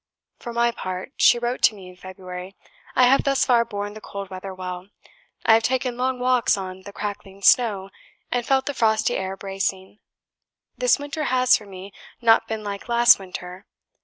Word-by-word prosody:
"For 240 - -7
my 235 0 +2
part," 185 +1 -6
(she 240 - +5
wrote 240 +1 -3
to 220 - +4
me 190 -2 -12
in 180 - -13
February) 185 0 -9 0.4
"I 255 - +5
have 265 +2 +4
thus 275 -1 +2
far 240 -2 +4
borne 205 -2 -5
the 215 - -11
cold 200 -2 -8
weather 185 +1 -7
well. 185 0 -7 0.6
I 225 - +6
have 225 - +5
taken 250 +1 -1
long 255 +1 -1
walks 250 -4 +2
on 190 -1 -7
the 200 - -10
crackling 200 -1 -7
snow, 200 -6 +3 0.4
and 245 -1 0
felt 265 +2 +1
the 285 - -2
frosty 220 -3 +1
air 190 0 -3
bracing. 195 0 -4 0.8
This - - +3
winter 290 +1 -4
has, 255 -1 +4
for 210 - -5
me, 195 0 -10 0.3
not 225 -1 +4
been 220 -1 -4
like 200 +2 -6
last 235 -1 +6
winter. 180 -1 -9
210 Hz, 185 wpm, -23 LUFS, 190-245 Hz, 0.8 s, I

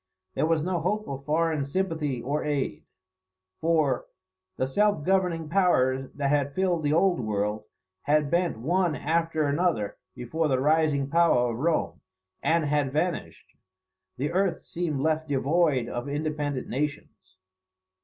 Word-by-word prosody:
There - - +1
was 160 -2 +1
no 180 0 -1
hope 210 +6 -1
of 135 0 -6
foreign 160 -1 +1
sympathy 150 -5 -2
or 145 +4 -1
aid; 145 -3 -2 0.7
for 155 -6 +1 0.5
"the 130 - +1
self 205 +2 +1
governing 180 -4 +1
powers 135 -8 +2
that 140 -1 0
had 145 -1 +1
filled 180 -3 +1
the 145 -1 0
old 175 +3 +3
world, 105 -1 -2 0.4
had 150 0 +2
bent 175 -5 +1
one 170 +6 +1
after 165 0 0
another 145 - 0 0.2
before 145 +6 -1
the 130 -3 +1
rising 150 -1 +2
power 140 -6 +3
of 115 - -5
Rome, 165 +3 0 0.4
and 165 -1 +2
had 145 -2 +1
vanished. 170 +4 -3 0.6
The 145 +5 -1
earth 185 -1 0
seemed 160 -5 -2
left 155 +1 0
void 140 -2 +2
of 120 +3 -4
independent 145 -2 -2
nations." 135 -9 -5
150 Hz, 140 wpm, -27 LUFS, 135-170 Hz, 0.7 s, old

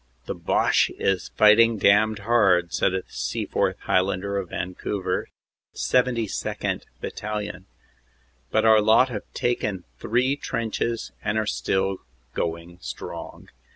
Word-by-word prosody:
"The - - -3
Boche - - +2
is 95 -2 0
fighting 110 +2 +6
damned 105 +2 +3
hard," 95 -7 +3
said 95 - +1
a 95 - -2
Seaforth - - -2
Highlander 95 +1 0
of 95 -3 -3
Van 90 +1 -4
couver, 95 -1 -2 0.5
72nd. 120 -4 0
Battalion. 105 -3 -5 0.8
"But 110 0 +2
our 110 -1 +6
lot 110 +5 +5
have 105 -4 -7
taken 105 -6 -1 0.2
three 125 +5 +1
trenches 115 -2 -2
and 110 +1 0
are 110 - +1
still 95 -1 0 0.4
going 85 +1 -4
strong." - - -8
105 Hz, 120 wpm, -24 LUFS, 95-115 Hz, 0.8 s, fighting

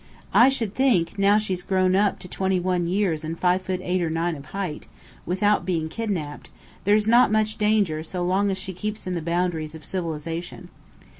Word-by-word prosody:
I 245 +3 +7
should 230 -7 -1
think, 205 -10 +1
now 200 +1 +5
she's 190 -4 -1
grown 185 0 +1
up 200 +1 +2
to - - -7
twenty 190 +1 0
one 180 -1 0
years 180 -4 0
and 160 +1 -4
five 180 +1 +2
foot 185 -1 -3
eight 180 0 0
or 170 - 0
nine 165 +1 -1
of 140 -1 -10
height, 190 -6 -5 0.4
without 205 +4 +2
being 165 -4 -1
kidnapped, 175 -8 -4 0.4
there's 210 +1 +3
not 235 0 +5
much 215 0 +1
danger 210 -7 +2
so 175 +3 -4
long 195 +3 +2
as 190 - -1
she 190 0 -6
keeps 210 +4 -5
in 185 - -3
the 170 - -2
boundaries 170 -2 -1
of 155 -2 -11
civilization. 170 +1 -5
185 Hz, 195 wpm, -24 LUFS, 170-205 Hz, 0.4 s, I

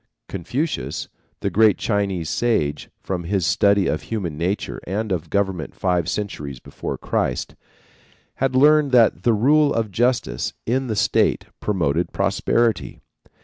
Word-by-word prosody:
Confucius, 125 - -3 0.3
the - - -1
great 110 -1 +4
Chinese 100 -6 -1
sage, 75 -12 0
from 90 -3 -3
his 95 0 0
study 100 +1 +3
of - - -1
human 95 -9 -4
nature 90 +6 -2
and 105 +3 -2
of 90 -4 -2
government 95 -5 -1
five 90 -2 0
centuries 75 -10 -4
before - - -6
Christ, - - -2 0.8
had 135 -1 0
learned 150 0 +5
that 120 -3 +5
the 120 - +3
rule 145 +7 +4
of 115 -5 -1
justice 120 - 0
in 130 +3 0
the 110 - -2
state - - +2
promoted 85 -5 0
prosperity. 115 -2 0
100 Hz, 135 wpm, -22 LUFS, 90-120 Hz, 0.8 s, learned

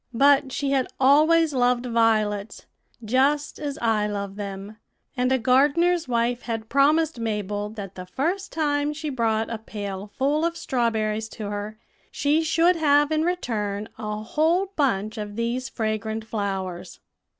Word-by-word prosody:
"But 275 +1 +4
she 275 +1 -1
had 265 -2 +1
always 305 +4 +5
loved 250 -1 +2
violets, 220 -3 0 0.4
just 275 +6 +1
as 290 -2 -4
I 220 -3 +1
love 200 -1 -4
them; 200 +1 -7 0.4
and 250 0 +1
a 265 - +4
gardener's 295 +8 +3
wife 240 0 0
had 225 -2 -5
promised 300 +1 +3
Mabel 210 -2 -2
that 200 -3 -8
the 185 0 -9
first 345 - -2
time 295 -1 0
she 305 0 -5
brought 225 -3 0
a 225 - -3
pail 205 -2 -6
full 290 +4 +1
of 335 0 -1
strawberries 220 -3 -1
to 205 -2 -4
her, 205 +1 -5 0.3
she 295 +3 +1
should 335 +2 +3
have 295 -1 +3
in 310 0 +2
return 215 - -2
a 210 -1 -4
whole 340 - +1
bunch 215 -6 0
of 205 -1 -6
these 240 +3 -2
fragrant 220 -1 -3
flowers. 195 -5 -4
235 Hz, 150 wpm, -24 LUFS, 215-290 Hz, 0.4 s, always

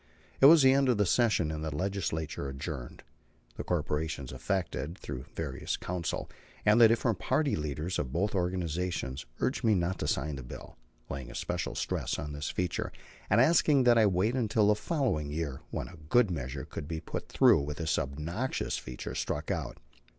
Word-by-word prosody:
It 135 - +9
was 160 -1 +8
the 130 0 +7
end 135 -1 +3
of 120 - +3
the 105 - +3
session, 100 -6 +2
and 80 0 -4
the 80 -2 -3
Legislature 85 -6 -2
adjourned. 65 -2 -6 0.5
The - - -5
corporations 75 -4 -2
affected, 85 -3 -2
through 65 0 -6
various - - -3
counsel, 90 -2 -3 0.4
and 110 +3 +6
the 115 - +10
different 115 -3 +1
party 140 +2 +1
leaders 75 +4 -3
of 65 - -2
both 95 +8 0
organizations, 90 -7 -2
urged 130 - 0
me 110 -2 +4
not 90 0 -1
to 75 - -2
sign 75 0 -1
the 65 - -7
bill, - - -10 0.3
laying 65 -2 -6
especial - - -3
stress - - -2
on 75 0 -5
this 75 +2 -3
feature, 90 -1 -2 0.4
and 105 - +4
asking 145 0 +5
that 120 -1 +6
I 110 - +6
wait 95 +5 +1
until 110 -4 +2
the 105 - +5
following 115 - -1
year, 75 -3 -3
when - - -4
a 90 - -12
good 120 -3 +4
measure 65 -4 -4
could 75 - -7
be 80 0 -3
put 80 - -6
through - - +5
with 75 +1 -4
this 80 -2 0
obnoxious 80 - -2
feature 60 0 -7
struck 75 +1 -2
out. - - -3
85 Hz, 180 wpm, -30 LUFS, 75-110 Hz, 0.5 s, the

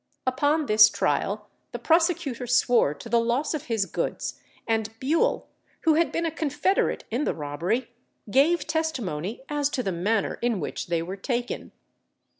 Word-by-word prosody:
Upon 290 +4 +1
this 215 -3 +7
trial - - -1 0.3
the - - -2
prosecutor 320 -7 +1
swore 240 - +3
to - - -10
the 235 0 +3
loss 240 +7 0
of 305 -1 -4
his 225 -6 0
goods - - -3 0.3
and 220 -1 0
Bewle, 335 - +1 0.3
who 320 - +4
had 330 +2 +2
been 335 - -1
a 325 - 0
confederate 305 +4 0
in 245 +6 0
the - - -1
robbery, 170 - -2 0.4
gave 290 +6 +3
testimony 250 - -2
as 290 -1 0
to 260 -3 -2
the 195 - -1
manner 200 +5 0
in 235 -4 +1
which 145 - -4
they 170 -1 0
were 185 +3 -6
taken. 240 +3 -3
245 Hz, 160 wpm, -26 LUFS, 215-305 Hz, 0.4 s, this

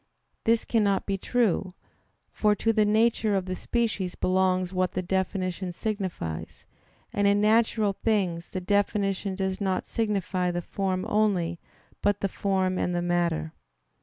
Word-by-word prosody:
This 230 0 +3
cannot 205 -4 +1
be 200 - -1
true; 195 -3 0 0.6
for 210 -1 +2
to 225 +2 +1
the 215 -1 +3
nature 220 0 +2
of 190 -2 0
the 185 0 -3
species 210 -5 -1
belongs 185 0 +1
what 185 -1 0
the 185 - -2
definition 185 0 -1
signifies; 185 - -4 0.5
and 205 0 +2
in 200 0 +4
natural 215 -1 +3
things 190 -6 -1
the 185 - -4
definition 200 0 0
does 190 0 -2
not 190 -2 0
signify 195 -5 -1
the 175 0 -2
form 190 0 -2
only, 195 -6 +1 0.4
but 205 0 +1
the 195 - 0
form 190 -1 0
and 180 - 0
the 175 - 0
matter. 170 -2 0
195 Hz, 145 wpm, -27 LUFS, 185-210 Hz, 0.6 s, in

